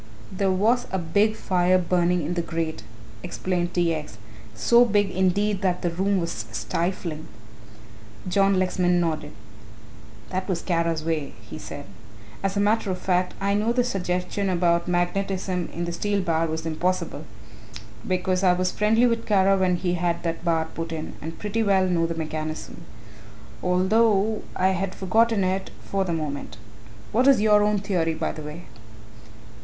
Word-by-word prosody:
"There 195 +1 0
was 220 +7 +2
a 190 - 0
big 200 +6 +1
fire 185 -3 +2
burning 175 -1 +1
in 170 - -2
the 175 - 0
grate," 165 -1 -3 0.4
explained 180 +4 -2
T. 170 -2 +2
X.; 150 -8 -6 0.4
"so 235 0 +5
big 205 -4 +2
indeed 190 +2 +1
that 180 -2 0
the 175 - +1
room 195 +3 +1
was 140 -11 -3
stifling." 170 - -3 1.0
John 195 +1 +3
Lexman 180 -1 +2
nodded. 155 -3 -1 1.0
"That 185 0 -2
was 175 -3 -1
Kara's 165 -3 0
way," 160 -3 -2
he - - -8
said; - - -8 0.6
"as 195 +1 -1
a - - +2
matter 210 0 +2
of 185 - -1
fact 180 0 0
I 200 +1 +1
know 210 +3 +1
the 245 +1 +2
suggestion 185 -2 -2
about 170 -1 +2
magnetism 180 0 -1
in 170 +1 -3
the 170 - -3
steel 205 +3 0
bar 165 -2 +1
was 160 0 -4
impossible, 180 +3 -2 0.8
because 185 -1 0
I 180 -1 +5
was 180 0 0
friendly 220 +3 +3
with 230 -1 0
Kara 195 -2 +4
when 185 -1 +2
he 175 0 -1
had 175 -1 -1
that 165 -1 -3
bar 165 -2 +1
put 165 +1 -6
in 160 -1 -5
and 160 +2 -6
pretty 210 +2 -2
well 195 -3 +3
know 170 -2 +1
the 165 - -3
mechanism, 155 -1 -5 0.8
although 205 +3 +2
I 185 +1 +3
had 190 0 -2
forgotten 220 +2 +2
it 190 +1 -1 0.2
for 195 -1 0
the 175 - -2
moment. 145 -9 -4 0.5
What 250 +5 +3
is 275 -4 +6
your 210 0 +5
own 210 0 +2
theory, 180 -5 0
by - - -2
the 155 - -8
way?" 150 +3 -8
180 Hz, 165 wpm, -24 LUFS, 170-200 Hz, 1.0 s, is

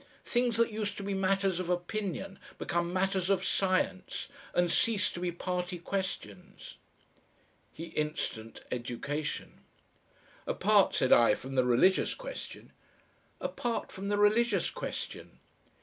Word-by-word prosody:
Things 240 -2 +1
that 230 0 +3
used 210 -1 -3
to 200 - -5
be 200 0 -2
matters 195 -1 +1
of 180 -1 -3
opinion 195 +1 -2 0.2
become 170 0 -1
matters 190 0 +1
of 190 -1 +2
science 185 -1 0 0.2
and 175 -1 +2
cease 220 -4 +2
to - - -6
be 175 0 -1
party 180 +1 -3
questions." 175 - -5 0.9
He 165 - -8
instanced 150 -7 -3
education. 125 +5 -3 0.9
"Apart," - - +4
said - - +4
I, 120 - +6
"from 135 +1 -8
the 130 -1 +3
religious 125 +10 +4
question." - - -8 0.7
"Apart 240 -1 -2
from 195 +1 -5
the 205 - +1
religious 210 -1 +3
question." - - -6
185 Hz, 125 wpm, -31 LUFS, 170-200 Hz, 0.9 s, I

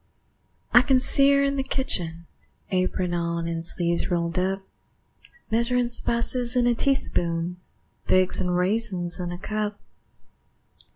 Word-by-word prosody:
I 245 - +8
can 265 0 +3
see 275 +2 +4
her 280 0 +3
in 280 0 0
the 270 - 0
kitchen, 170 -12 -3 0.5
Apron 185 -1 -1
on 170 -1 -2
and 165 -1 -4
sleeves 170 +1 -1
rolled 170 -1 -1
up, 190 +1 -2 0.9
Measurin' 240 +2 +1
spices 240 +1 -1
in 245 -1 +2
a 240 - +3
teaspoon, 175 -9 0 0.5
Figs 185 0 +5
and 180 -1 -1
raisins 185 -2 +1
in 175 -1 -4
a 175 - -6
cup. 210 +2 -4
190 Hz, 130 wpm, -24 LUFS, 175-240 Hz, 0.9 s, I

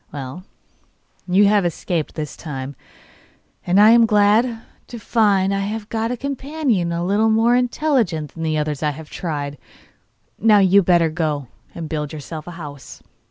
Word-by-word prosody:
'Well, 140 +5 -7 0.8
you 190 +3 +4
have 205 -1 +3
escaped 170 -1 -3
this 150 -2 -5
time, 135 -3 -7 0.9
and 180 +3 +3
I 215 +2 +8
am 230 -1 +6
glad 220 +3 +2 0.2
to 240 - -8
find 205 -4 +2
I 195 - 0
have 210 +2 -4
got 225 0 -2
a 250 - -3
companion 275 - -2
a 170 +1 -2
little 210 +4 +2
more 225 +2 +3
intelligent 245 - 0
than 165 - -9
the 155 -1 -1
others 150 -2 -2
I 150 - +1
have 160 -1 -11
tried. 145 -5 -4 0.8
Now, 215 -2 +5
you 195 0 +5
had 195 - 0
better 170 -2 +4
go 150 -5 -2 0.3
and 165 -2 -5
build 150 -1 -4
yourself 155 +1 -8
a - - -6
house. 145 -4 -10
185 Hz, 165 wpm, -20 LUFS, 155-220 Hz, 0.9 s, I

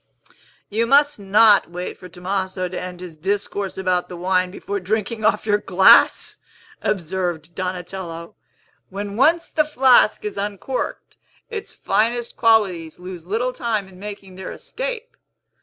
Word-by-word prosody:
"You 225 +3 0
must 285 0 +4
not 205 +1 +5
wait 180 +1 -5
for 180 - -12
Tomaso 185 +1 -3
to 180 - -5
end 180 -1 -7
his 175 -3 -9
discourse 195 +2 -2
about 180 -1 0
the 180 - -7
wine, 185 +1 +1
before 200 +1 -4
drinking 215 +3 -2
off 210 -1 +2
your 205 -1 +2
glass," 190 -1 +5 0.4
observed 175 -4 -2
Donatello. 180 -2 -5 0.6
"When 200 +1 -5
once 330 +8 +3
the 310 - +2
flask 260 -8 +4
is 205 -1 -4
uncorked, 205 +6 -4 0.3
its 425 -3 -5
finest 235 +2 0
qualities 195 -8 +2
lose 180 -2 -9
little 240 +6 -1
time 225 -5 -2
in 185 -1 -16
making 200 -2 -9
their 190 - -6
escape. - - -6
195 Hz, 140 wpm, -21 LUFS, 180-225 Hz, 0.6 s, not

